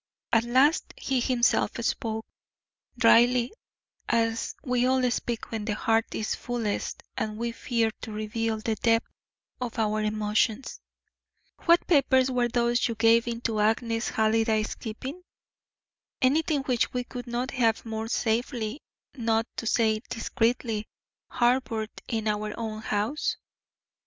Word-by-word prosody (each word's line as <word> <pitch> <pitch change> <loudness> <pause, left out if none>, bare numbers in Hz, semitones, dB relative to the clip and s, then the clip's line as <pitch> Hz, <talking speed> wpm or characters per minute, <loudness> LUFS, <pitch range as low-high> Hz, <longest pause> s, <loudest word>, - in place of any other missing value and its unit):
At 230 0 +4
last 265 +7 +3
he 265 -2 0
himself 245 -1 +2
spoke, 220 -1 -2 0.7
dryly, 240 +1 +5 0.6
as 230 -1 0
we 250 -2 +1
all 255 -1 +2
speak 235 -1 -3
when 220 -2 -3
the 210 -2 -1
heart 225 +1 +1
is 215 - -1
fullest 235 -4 -3
and 215 -1 -3
we 235 +1 -2
fear 230 -1 0
to 220 - -6
reveal 220 +1 -2
the 220 +1 -1
depth 230 0 +2 0.5
of 245 -2 -4
our 215 -1 +1
emotions. 215 +3 0 0.9
"What 340 0 +5
papers 265 -5 +4
were 245 -1 +2
those 240 +1 +2
you 230 - -3
gave 230 +1 +4
into 230 -2 -2
Agnes 225 +2 +1
Halliday's 220 0 +1
keeping? 260 +9 -7 1.0
Anything 290 +2 +2
which 250 -3 +1
we 250 0 -1
could 245 0 -8
not 245 +2 -2
have 230 -3 +1
more 220 0 -4
safely, 230 +2 -1 0.3
not 225 -3 +1
to 230 - -3
say 220 -1 +2
discreetly, 225 -2 -1 0.4
harboured 240 -3 +1 0.2
in 220 -1 -2
our 210 0 -2
own 220 -2 -4
house?" 215 +7 -1
230 Hz, 130 wpm, -27 LUFS, 220-245 Hz, 1.0 s, dryly